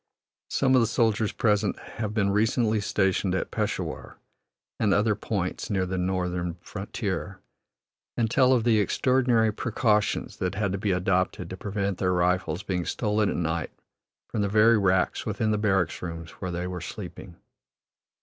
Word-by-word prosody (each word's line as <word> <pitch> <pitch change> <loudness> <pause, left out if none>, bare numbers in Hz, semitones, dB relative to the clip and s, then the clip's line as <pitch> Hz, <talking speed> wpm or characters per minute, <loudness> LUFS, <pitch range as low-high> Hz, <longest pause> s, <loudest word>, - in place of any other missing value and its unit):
Some 135 -1 +2
of 130 - +6
the 115 - +2
soldiers 110 -2 +1
present 105 -2 +1
have 110 -2 -5
been 100 -2 +1
recently 110 +1 +2
stationed 95 -1 +1
at - - -2
Peshawur - - -3 0.6
and 105 -4 +3
other 105 +1 +3
points 100 -3 -3
near 95 -2 +1
the 95 0 -3
northern 90 -2 -1
frontier, 95 0 -5 0.8
and 115 - +2
tell 130 +3 +4
of 120 -3 +2
the 115 -2 +4
extraordinary 120 -1 +2
precautions 110 -3 0
that 90 +1 -2
had 100 -1 0
to 100 - -2
be 105 - -1
adopted 90 -1 0
to - - -4
prevent 100 -1 -2
their 90 -1 +1
rifles 90 +1 0
being 90 -2 -1
stolen 105 +3 0
at - - -2
night 80 -1 -1 0.6
from 105 - -2
the 100 - 0
very 110 +3 +5
racks 95 -2 +1
within 110 -1 0
the 105 - +1
barrack 95 -5 +1
rooms 85 -2 -6
where 95 - -6
they 90 0 -3
were 90 -1 -5
sleeping. - - -8
100 Hz, 160 wpm, -26 LUFS, 90-110 Hz, 0.8 s, of